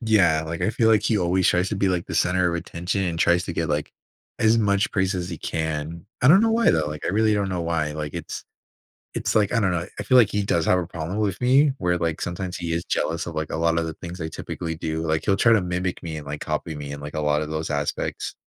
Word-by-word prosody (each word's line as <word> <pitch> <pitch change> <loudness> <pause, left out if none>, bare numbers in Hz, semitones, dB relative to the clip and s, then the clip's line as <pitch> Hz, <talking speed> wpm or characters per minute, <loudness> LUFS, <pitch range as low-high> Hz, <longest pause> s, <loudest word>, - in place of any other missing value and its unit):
Yeah, 95 -9 +3
like, 80 +1 -5
I 110 - +2
feel 110 0 +2
like 110 -2 +4
he 110 -1 +1
always 90 +1 +2
tries 90 +2 +2
to 105 - -1
be, 95 0 +2
like, 90 -2 -1
the - - -5
center 90 0 +2
of 85 - -1
attention 85 +3 -3
and 85 -3 -2
tries 85 +1 +3
to 90 - -4
get, 85 -1 -2
like, 75 -1 -2 0.5
as 110 +1 +4
much 100 -2 +2
praise 95 -1 +1
as 90 -1 -3
he 85 - -5
can. 80 +3 -4 0.2
I 125 - +6
don't 190 +6 +8
know 225 - +3
why, 230 +1 +4
though, 80 -2 +1
like, 75 0 -6
I - - -1
really 110 +2 +3
don't 100 -1 0
know 90 -2 -2
why, 80 -3 -1
like, 75 -1 -5
it's - - -6 0.7
it's - - -1
like 105 0 +3
I 115 - +3
don't 100 -4 +2
know, 85 +1 -2
I 105 - -2
feel 125 +5 +5
like 110 -4 +6
he 105 0 0
does 85 -4 +1
have 90 - +4
a 85 - -2
problem 85 +4 -5
with 100 -2 -1
me 135 +4 +4
where, 90 -1 +1
like, 85 -2 -2
sometimes 90 +1 -4
he 85 -1 -3
is 85 - -2
jealous 85 0 -1
of, 85 - -6
like, 80 0 -3
a - - -2
lotta 85 0 +1
the 80 - -5
things 85 +1 -8
I 80 - -3
typically 80 +1 -5
do, 80 0 -3
like, 80 -1 -1
he'll 100 -1 +2
try 115 +3 +4
to 105 - +3
mimic 90 0 -2
me 80 -2 -5
and, 75 - -10
like, 75 +1 -5
copy 75 +1 -3
me 70 -1 -6
in, 70 - -7
like, 75 +1 -8
a 75 - -1
lotta 75 0 +1
those 80 0 -4
aspects. 75 0 -2
85 Hz, 275 wpm, -24 LUFS, 80-100 Hz, 0.7 s, don't